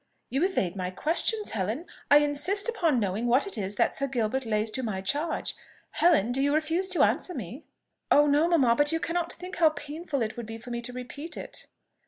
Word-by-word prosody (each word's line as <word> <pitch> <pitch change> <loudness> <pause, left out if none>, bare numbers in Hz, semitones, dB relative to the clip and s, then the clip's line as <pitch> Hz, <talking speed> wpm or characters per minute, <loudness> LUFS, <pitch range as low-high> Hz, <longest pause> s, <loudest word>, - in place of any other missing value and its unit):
"You 270 +6 +1
evade 200 - 0
my 180 -2 -3
questions, 340 - 0
Helen. 220 - -2 0.2
I 290 - +8
insist 295 +9 +2
upon 335 - +1
knowing 205 +3 -1
what 250 +4 +3
it 395 - -5
is 200 -1 -4
that - - +2
Sir 275 - -2
Gilbert 250 0 -1
lays 215 0 0
to 260 - -3
my 215 -6 -3
charge. 290 - -2 0.4
Helen! 310 - +3
do 265 +2 0
you 285 +1 +2
refuse 325 +4 0
to 365 - +3
answer 360 - +1
me?" 240 - -7 0.4
"Oh 295 - +6
no, 295 +3 +3
mamma! 275 -9 +4
but 290 +3 +3
you 325 - 0
cannot 340 +1 -2
think 365 +2 -7
how 330 -2 +6
painful 295 -2 -4
it 220 - -4
would 235 -2 -6
be 225 0 -6
for 240 +2 -10
me 235 0 -3
to 245 +1 -5
repeat 255 +6 -7
it!" - - -6
285 Hz, 215 wpm, -27 LUFS, 230-330 Hz, 0.4 s, I